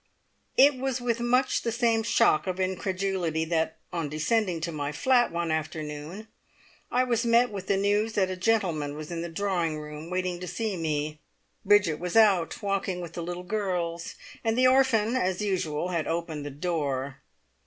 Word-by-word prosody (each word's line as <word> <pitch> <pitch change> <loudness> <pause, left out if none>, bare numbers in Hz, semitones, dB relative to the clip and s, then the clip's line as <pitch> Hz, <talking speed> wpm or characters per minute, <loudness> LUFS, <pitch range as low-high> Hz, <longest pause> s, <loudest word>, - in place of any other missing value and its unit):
It 280 0 +6
was 265 -1 -1
with 240 -1 -1
much 250 +2 +2
the 230 - -1
same 230 -1 +2
shock 220 -6 +3
of 185 0 -2
incredulity 185 -3 -1
that, 160 -1 -1 0.2
on 165 -4 -2
descending 170 +4 0
to 170 +1 -2
my 145 -2 -3
flat 245 - +3
one 170 -1 -1
afternoon, 155 +5 -4 0.6
I 250 +1 +3
was 235 -2 0
met 235 +1 +4
with 195 -2 -6
the 200 - +2
news 205 +3 +1
that 190 -3 +1
a - - -2
gentleman 175 -8 0
was 155 +2 -7
in 170 -1 -3
the 170 - -4
drawing 170 -3 -1
room 150 +2 -8
waiting 180 -1 -2
to 180 - -6
see 220 +1 -2
me. 155 -2 -2 0.4
Bridget 205 -6 +4
was 180 +2 -4
out 200 -7 +4
walking 195 -2 -1
with 170 -2 -7
the 170 - -4
little 175 +1 -5
girls, 180 -4 -2 0.3
and 225 0 0
the 255 - +4
orphan, 255 -3 +4
as 185 -6 0
usual, 175 -4 -1
had 170 -3 -1
opened 165 -3 -3
the - - -4
door. 140 -3 -2
180 Hz, 175 wpm, -27 LUFS, 160-220 Hz, 0.6 s, It